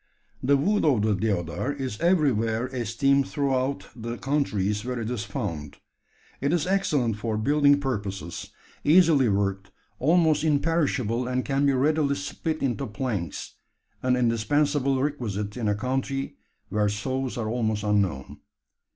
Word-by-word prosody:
The 140 Hz, +2 st, +3 dB
wood 205 Hz, +10 st, +1 dB
of 130 Hz, -9 st, +3 dB
the 110 Hz, -1 st, +2 dB
deodar 100 Hz, +3 st, -1 dB
is 130 Hz, -6 st, -5 dB
everywhere 125 Hz, -, +2 dB
esteemed 130 Hz, +3 st, +1 dB
throughout 140 Hz, -1 st, -1 dB
the 115 Hz, 0 st, -5 dB
countries 105 Hz, -8 st, 0 dB
where 125 Hz, 0 st, -3 dB
it 115 Hz, +1 st, -3 dB
is 110 Hz, -5 st, -3 dB
found. 80 Hz, -6 st, -5 dB, 0.6 s
It 140 Hz, -, +1 dB
is 170 Hz, -3 st, +1 dB
excellent 150 Hz, -, +1 dB
for 110 Hz, 0 st, -2 dB
building 145 Hz, +4 st, +4 dB
purposes, 100 Hz, -6 st, -4 dB, 0.3 s
easily 155 Hz, -6 st, +5 dB
worked, 100 Hz, -1 st, -1 dB, 0.3 s
almost 160 Hz, +1 st, +3 dB
imperishable, 145 Hz, -6 st, +1 dB
and 125 Hz, 0 st, -1 dB
can 140 Hz, 0 st, +1 dB
be 140 Hz, -, +3 dB
readily 140 Hz, +2 st, +2 dB
split 155 Hz, +3 st, -4 dB
into 135 Hz, +1 st, -1 dB
planks 105 Hz, -, -4 dB, 0.5 s
an 130 Hz, 0 st, +2 dB
indispensable 135 Hz, +4 st, +1 dB
requisite 110 Hz, -8 st, -2 dB
in 120 Hz, -3 st, -2 dB
a 105 Hz, -, +2 dB
country 135 Hz, +4 st, -2 dB, 0.3 s
where 105 Hz, +1 st, +1 dB
saws 130 Hz, +6 st, -3 dB
are 115 Hz, -2 st, -2 dB
almost 110 Hz, -3 st, -1 dB
unknown. 100 Hz, -10 st, 0 dB
125 Hz, 135 wpm, -26 LUFS, 105-140 Hz, 0.6 s, easily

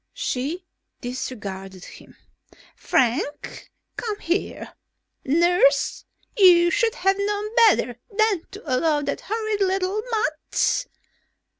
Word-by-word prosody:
She 345 Hz, -, -3 dB, 0.3 s
disregarded 195 Hz, -7 st, -6 dB
him. -, -, -15 dB, 0.6 s
"Frank! 260 Hz, +4 st, -1 dB, 0.3 s
Come 430 Hz, -3 st, -3 dB
here! 345 Hz, +4 st, -3 dB, 0.5 s
Nurse, 315 Hz, -2 st, +2 dB, 0.3 s
you 350 Hz, -4 st, +6 dB
should 455 Hz, +4 st, +1 dB
have 390 Hz, +1 st, +1 dB
known 415 Hz, +2 st, -2 dB
better 245 Hz, -, +1 dB
than 430 Hz, -4 st, +1 dB
to 405 Hz, +2 st, -11 dB
allow 295 Hz, +2 st, +1 dB
that -, -, -3 dB
horrid 435 Hz, -1 st, -2 dB
little 380 Hz, +2 st, 0 dB
mutt...." 440 Hz, +4 st, 0 dB
355 Hz, 100 wpm, -23 LUFS, 275-415 Hz, 0.6 s, you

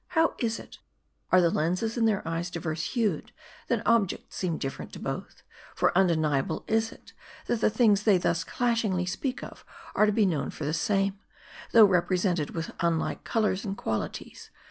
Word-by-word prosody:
How 325 Hz, 0 st, +4 dB
is 230 Hz, -1 st, 0 dB
it? -, -, -12 dB, 0.5 s
Are 185 Hz, -, +7 dB
the 170 Hz, -1 st, +3 dB
lenses 180 Hz, +9 st, 0 dB
in 235 Hz, -2 st, +2 dB
their 200 Hz, -6 st, 0 dB
eyes 165 Hz, +2 st, -2 dB
diverse 160 Hz, -2 st, -3 dB
hued, 230 Hz, -5 st, 0 dB, 0.4 s
that -, -, -1 dB
objects 230 Hz, -5 st, +1 dB
seem 175 Hz, -4 st, -1 dB
different 135 Hz, -1 st, -5 dB
to -, -, -7 dB
both; -, -, -6 dB, 0.3 s
for -, -, +2 dB
undeniable 160 Hz, -5 st, +2 dB
is 225 Hz, 0 st, +1 dB
it, -, -, -16 dB, 0.3 s
that 235 Hz, -, -1 dB
the -, -, +4 dB
things 215 Hz, -2 st, +3 dB
they 210 Hz, -3 st, +4 dB
thus 170 Hz, -1 st, 0 dB
dashingly 225 Hz, -5 st, 0 dB
speak 250 Hz, +8 st, -3 dB
of -, -, -10 dB, 0.3 s
are 215 Hz, -, +4 dB
to -, -, +3 dB
be 210 Hz, 0 st, +3 dB
known 150 Hz, -7 st, 0 dB
for 150 Hz, -, -6 dB
the 150 Hz, -, -1 dB
same; 195 Hz, +2 st, 0 dB, 0.5 s
though 225 Hz, -2 st, +9 dB
represented 180 Hz, -3 st, +1 dB
with 165 Hz, 0 st, -3 dB
unlike 170 Hz, -1 st, 0 dB
colors 210 Hz, -3 st, 0 dB
and 200 Hz, -1 st, -4 dB
qualities. 110 Hz, -, -4 dB
190 Hz, 175 wpm, -28 LUFS, 170-220 Hz, 0.5 s, though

